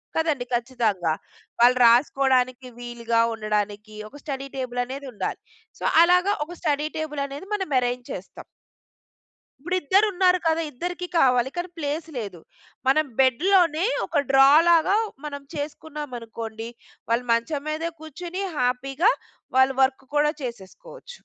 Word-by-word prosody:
కదండీ, 310 -6 0
ఖచ్చితంగా! 225 -9 0 0.5
వాళ్ళు 245 +1 +6
రాసుకోవడానికి 255 +1 +3
వీలుగా 235 -1 -1
ఉండడానికి, 210 -1 -3
ఒక 290 - -13
స్టడీ 275 -2 -5
టేబుల్ 245 -1 -3
అనేది 270 +2 -7
ఉండాలి. 210 - -3 0.4
సో - - -8 0.2
అలాగ 360 +2 +4 0.2
ఒక 350 - -10
స్టడీ 300 -2 0
టేబుల్ 300 -2 -3
అనేది 285 +7 -8
మనం 380 -8 -2
అరేంజ్ 245 0 -2
చేస్తాం. 190 - -8 1.2
ఇప్పుడు 355 +5 -2
ఇద్దరు 385 +9 +4
ఉన్నారు 365 -1 +3
కదా! 325 0 +2
ఇద్దరికీ 355 +6 -5
కావాలి 250 -3 +4
కానీ 350 +1 -3
ప్లేస్ 305 +1 -3
లేదు. 200 -6 -5 0.5
మనం 310 +3 +4
బెడ్‌లోనే 330 - +3 0.2
ఒక 290 -4 +1
డ్రా 270 0 +7 0.2
లాగా 340 +4 +4 0.3
మనం 285 -1 -6
చేసుకున్నామనుకోండి, 245 -7 -6 0.4
వాళ్ళు 235 +2 +1
మంచం 280 +5 -1
మీద 320 +2 -2
కూర్చొని 350 +5 -6
హ్యాపీగా 270 - +2 0.5
వాళ్ళు 260 0 +4
వర్క్ 265 0 0
కూడా 300 +1 +3
చేసేసుకోవచ్చు. 240 - -9
275 Hz, 125 wpm, -24 LUFS, 245-320 Hz, 1.2 s, డ్రా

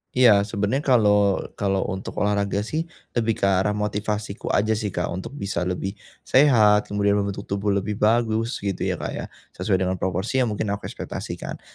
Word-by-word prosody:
Iya, 105 -5 +6
sebenarnya 110 +7 -1
kalau 105 -5 +4 0.2
kalau 95 -1 +1
untuk 95 0 -6
olahraga 100 0 0
sih, 160 +8 -3 0.2
lebih 115 -2 0
ke - - -10
arah 100 +2 +2
motivasiku 105 0 -3
saja 110 +2 +2
sih 110 -1 0
Kak 90 -3 -2
untuk 95 +10 -6
bisa 95 -7 -2
lebih 95 +3 -3 0.2
sehat, 110 -7 +5
kemudian 100 0 +1
membentuk 100 0 -3
tubuh 100 0 -1
lebih 100 +1 -2
bagus, 115 +1 +2
gitu 100 -3 -1
ya - - 0
Kak - - -5
ya, - - -5 0.3
sesuai 95 -3 0
dengan 95 -1 -1
proporsi 95 +8 -1
yang 125 - +2
mungkin 105 -1 -2
aku 100 - -4
ekspektasikan. - - -6
105 Hz, 175 wpm, -24 LUFS, 100-110 Hz, 0.3 s, Iya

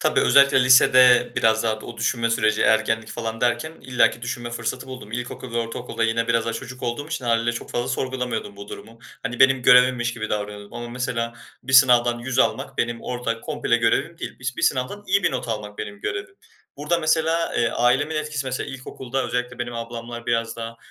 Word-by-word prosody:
Tabii, - - +2
özellikle 140 -2 +5
lisede 125 -1 +6
biraz 110 0 +3
daha 110 -1 0
o 120 +2 -10
düşünme 115 0 0
süreci, 110 -1 +2
ergenlik 110 0 +2
falan 115 -1 -5
derken 120 +5 0
illaki 120 -2 +1
düşünme 120 0 -4
fırsatı 120 +2 -4
buldum. 130 -5 -9
İlkokul 125 0 -6
ve - - +1
ortaokulda 115 0 -3
yine 115 0 0
biraz 115 -1 +2
daha 115 - -2
çocuk 125 +2 -8
olduğum 125 +4 -3
için 155 -6 -4
hâliyle 115 0 +1
çok 115 - -7
fazla 120 - -2
sorgulamıyordum 125 -6 -3
bu 100 0 -10
durumu. 115 +1 -10 0.2
Hani, 120 0 -4
benim 130 -1 +5
görevimmiş 125 -1 +5
gibi 110 -2 -5
davranıyordum 105 -1 -5
ama 120 0 -6
mesela 120 -1 -3 0.3
bir 130 - -6
sınavdan 120 -2 +5
100 125 +1 -4
almak - - 0
benim 120 0 -1
orada 120 -2 -3
komple 145 -4 0
görevim 120 +8 0
değil. - - -7
Bis 130 0 -4
bir - - -5
sınavdan 130 +11 0
iyi 200 +1 +2
bir - - +2
not 125 -2 -4
almak 105 -2 -5
benim 100 0 -6
görevim. 390 0 -5 0.4
Burada 150 +4 0
mesela, 160 +1 +1
eee, 120 - +2
ailemin 130 +6 +1
etkisi 150 -3 -3
mesela 130 0 -3
ilkokulda 130 0 -5
özellikle 125 0 -3
benim 120 0 -4
ablamlar 115 0 -7
biraz 115 -1 -1
daha 115 0 -6
120 Hz, 190 wpm, -23 LUFS, 115-130 Hz, 0.4 s, lisede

